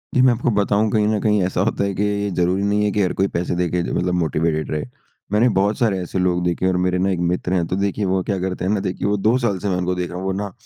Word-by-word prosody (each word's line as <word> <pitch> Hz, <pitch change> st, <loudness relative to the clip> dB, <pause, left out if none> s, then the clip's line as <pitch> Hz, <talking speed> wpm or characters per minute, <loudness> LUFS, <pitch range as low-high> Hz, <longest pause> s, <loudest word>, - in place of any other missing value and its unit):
जी, 130 Hz, -, +5 dB
मैं 130 Hz, -2 st, +5 dB
आपको 120 Hz, +2 st, -1 dB
बताऊँ 105 Hz, +1 st, +1 dB
कहीं 105 Hz, -2 st, +2 dB
न 110 Hz, -1 st, +1 dB
कहीं 105 Hz, -2 st, +2 dB
ऐसा 90 Hz, -1 st, -1 dB
होता 100 Hz, -1 st, 0 dB
है 100 Hz, 0 st, -1 dB
कि 105 Hz, -, 0 dB
ये 105 Hz, 0 st, 0 dB
ये 100 Hz, -, -1 dB
ज़रूरी 90 Hz, +3 st, +1 dB
नहीं 105 Hz, +1 st, +1 dB
है 105 Hz, -, +1 dB
कि 105 Hz, -, 0 dB
हर 90 Hz, -, +1 dB
कोई 95 Hz, +1 st, +1 dB
पैसे 85 Hz, +1 st, -1 dB
दे 90 Hz, 0 st, 0 dB
के 90 Hz, 0 st, 0 dB
जो -, -, -4 dB
मतलब 90 Hz, 0 st, 0 dB
मोटिवेटेड 80 Hz, 0 st, -1 dB
रहे। 75 Hz, -, -2 dB, 0.5 s
मैंने 115 Hz, +4 st, +4 dB
बहुत 100 Hz, +2 st, +2 dB
सारे 110 Hz, -5 st, +1 dB
ऐसे 90 Hz, +1 st, -3 dB
लोग 90 Hz, -1 st, +1 dB
देखे 85 Hz, +1 st, 0 dB
हैं 95 Hz, -, +3 dB
और 90 Hz, -, 0 dB
मेरे 90 Hz, 0 st, +1 dB
ना 95 Hz, +1 st, +1 dB
एक 90 Hz, -, -1 dB
मित्र 90 Hz, +1 st, -2 dB
हैं 85 Hz, -3 st, +1 dB
तो 90 Hz, -, -2 dB
देखिए 100 Hz, +1 st, -1 dB
वो 95 Hz, 0 st, +1 dB
क्या 100 Hz, -, +1 dB
करते 95 Hz, -1 st, -3 dB
हैं 100 Hz, -, +1 dB
ना 105 Hz, -, +1 dB
देखिए 95 Hz, +2 st, -2 dB
वो 105 Hz, 0 st, +1 dB
2 120 Hz, +3 st, +4 dB
साल 110 Hz, -6 st, 0 dB
से 100 Hz, -, -2 dB
मैं 90 Hz, -, 0 dB
उनको 90 Hz, 0 st, -1 dB
देख 90 Hz, -1 st, -3 dB
रहा 90 Hz, -, -6 dB
हूँ 95 Hz, -, -5 dB
वो 95 Hz, -, 0 dB
ना, 100 Hz, +1 st, -3 dB
95 Hz, 325 wpm, -21 LUFS, 90-105 Hz, 0.5 s, जी